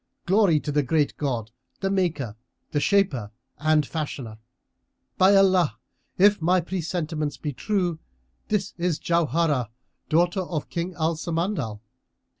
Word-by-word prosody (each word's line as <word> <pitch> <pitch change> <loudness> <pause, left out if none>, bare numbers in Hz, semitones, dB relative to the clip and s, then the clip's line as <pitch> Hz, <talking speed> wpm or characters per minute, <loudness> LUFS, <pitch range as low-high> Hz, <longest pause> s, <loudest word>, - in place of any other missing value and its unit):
Glory 190 -4 +4
to 150 - -4
the 145 0 +2
Great 145 +2 +1
God, 120 -6 -2 0.3
the 195 0 -1
Maker, 160 - -1 0.4
the 145 - +1
Shaper 155 - +2 0.3
and 155 0 +3
Fashioner! 135 -8 -5 0.8
By 190 +2 +6
Allah, 185 - +4 0.4
if 200 0 +5
my 180 +3 +3
presentiments 165 -4 -3
be 150 -2 -4
true, 175 - -1 0.5
this 210 -1 -1
is 170 -3 +1
Jauharah, 160 -6 +1 0.4
daughter 175 +4 +2
of 170 -5 -4
King 175 +1 -3
Al 160 0 0
Samandal! 165 - -2
165 Hz, 125 wpm, -25 LUFS, 145-185 Hz, 0.8 s, By